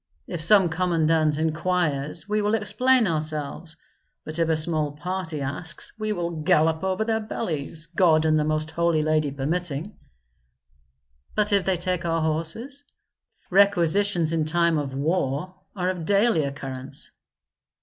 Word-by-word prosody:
If 175 -3 -5
some 190 +3 +6
commandant 160 -3 +1
inquires 160 -1 -1
we 210 0 0
will 210 +2 +1
explain 250 +3 +2
ourselves, 155 -1 -2 0.5
but 155 +2 -4
if 165 -1 +1
a 160 - +2
small 155 -2 +1
party 160 -1 -4
asks 150 +5 -6
we 215 0 -2
will 170 -5 -3
gallop 160 +2 +2
over 190 +3 0
their 220 0 0
bellies, 165 -7 -4
God 165 -1 +3
and 155 0 +3
the - - +1
Most 155 +1 -1
Holy 170 -1 +1
Lady 155 -1 +1
permitting." 155 +5 -3 1.4
"But 210 0 +1
if 200 -2 +3
they 190 -2 +1
take 180 0 -1
our 165 -1 0
horses? 170 - -2 0.7
Requisitions 190 -2 +3
in 160 -2 0
time 170 0 +2
of 135 -2 -4
war 150 +2 -1 0.2
are 185 -1 0
of 175 -3 -6
daily 200 -4 +3
occurrence." 135 -2 -6
165 Hz, 140 wpm, -24 LUFS, 155-185 Hz, 1.4 s, some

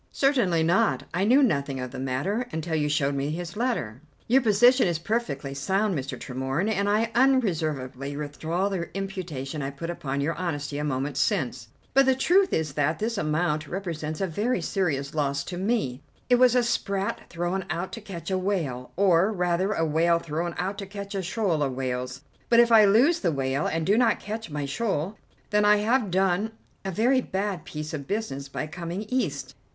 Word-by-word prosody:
"Certainly 240 - +2
not. 195 +7 +2
I 185 +3 +1
knew 260 +6 +5
nothing 140 - 0
of 125 -1 -5
the - - -7
matter 160 - -1
until 160 +1 -3
you 150 -2 +1
showed 140 -1 +1
me 140 +1 -1
his 175 +4 -5
letter." 210 - -2 0.3
"Your 260 +4 +5
position 240 +2 +5
is 170 -2 0
perfectly 160 - -2
sound, 190 +8 0
Mr. 135 -2 -4
Tremorne, 130 - -2
and 200 -1 +1
I 220 +2 +2
unreservedly 155 - +1
withdraw 160 +5 -2
the 185 -4 -3
imputation 170 -8 -4
I 135 - -2
put 155 +5 -5
upon 140 -5 -3
your 145 +4 0
honesty 145 -5 -3
a - - -2
moment 140 -1 -2
since. 125 -4 0 0.3
But 270 0 +5
the 265 - +5
truth 375 +8 +3
is 155 -3 -1
that 150 +2 +1
this 225 +2 -2
amount 155 -3 0
represents 160 -4 -4
a - - +2
very 205 +7 -1
serious 155 -6 -1
loss 140 -2 0
to 180 - -6
me. 190 - -1 0.3
It 245 - +7
was 250 0 +5
a 250 - +4
sprat 200 -4 -2
thrown 175 +3 -2
out 175 +2 -3
to 225 - -7
catch 185 -4 -7
a 185 - +1
whale, 160 -11 -2
or, 190 +1 +4
rather, 180 0 0
a 165 -6 +1
whale 165 +2 +3
thrown 170 +1 -3
out 195 +3 -2
to 195 - -6
catch 200 0 -7
a 195 - -1
shoal 185 -3 0
of 135 -3 0
whales. 125 0 -3 0.3
But 235 - +6
if 235 0 +5
I 220 -2 +8
lose 240 +12 +4
the 175 - +1
whale 135 0 -1
and 160 0 -1
do 205 +6 +3
not 235 -2 +3
catch 220 -1 -5
my 145 -1 -3
shoal, 195 +3 -2 0.3
then 210 0 +3
I 210 0 +6
have 220 +1 +1
done 190 +4 +1 0.3
a 195 - -3
very 240 +7 +2
bad 195 -3 -3
piece 155 0 -6
of 140 -3 -5
business 165 -10 -3
by - - -3
coming 175 +4 -5
East. 255 +3 -2
175 Hz, 195 wpm, -26 LUFS, 145-210 Hz, 0.3 s, I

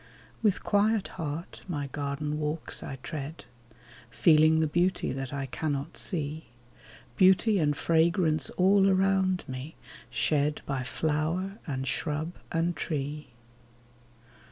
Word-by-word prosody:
With 210 -4 +2
quiet 210 0 +2
heart 160 0 -5
my 150 -6 -2
garden 145 +2 -3
walks 150 +1 -2
I 135 - -5
tread, 155 0 -6 0.6
Feeling 155 +4 +5
the 160 - +3
beauty 175 +4 +1
that 135 -1 -4
I 140 -1 -3
cannot 145 +3 -3
see; 155 -3 -3 0.7
Beauty 190 +2 +5
and 150 -3 +1
fragrance 160 -2 +2
all 195 +1 +5
around 190 -1 +2
me 130 +4 -6 0.3
shed 150 0 0
By 135 -2 -2
flower, 160 - -1
and 135 -2 -3
shrub, 155 +5 -2 0.2
and 170 +1 0
tree. 150 -1 -3
155 Hz, 115 wpm, -28 LUFS, 145-180 Hz, 0.7 s, Feeling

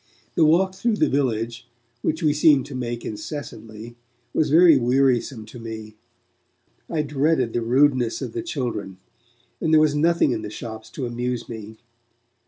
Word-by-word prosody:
The 170 - +3
walk 185 +5 +3
through 225 +3 0
the - - +1
village, 120 -3 -1 0.3
which 160 +2 -1
we 150 -2 +3
seemed 145 -3 +3
make 120 -1 -4
incessantly, 115 -1 -7 0.4
was 155 - +1
very 165 +1 +7
wearisome 125 -2 +1
to 115 +3 -11
me. 110 -1 -8 1.0
I 155 -3 0
dreaded 145 -4 +1
the 120 - 0
rudeness 125 0 +2
of - - -5
the 355 - -3
children, 120 - -4 0.6
and 160 - 0
there 155 - +6
was 155 -1 +3
nothing 160 -1 +2
in 115 -3 -2
the 105 - -6
shops 110 0 -8
to 135 - -4
amuse 120 0 -3
me. 110 -1 -8
130 Hz, 155 wpm, -23 LUFS, 115-150 Hz, 1.0 s, very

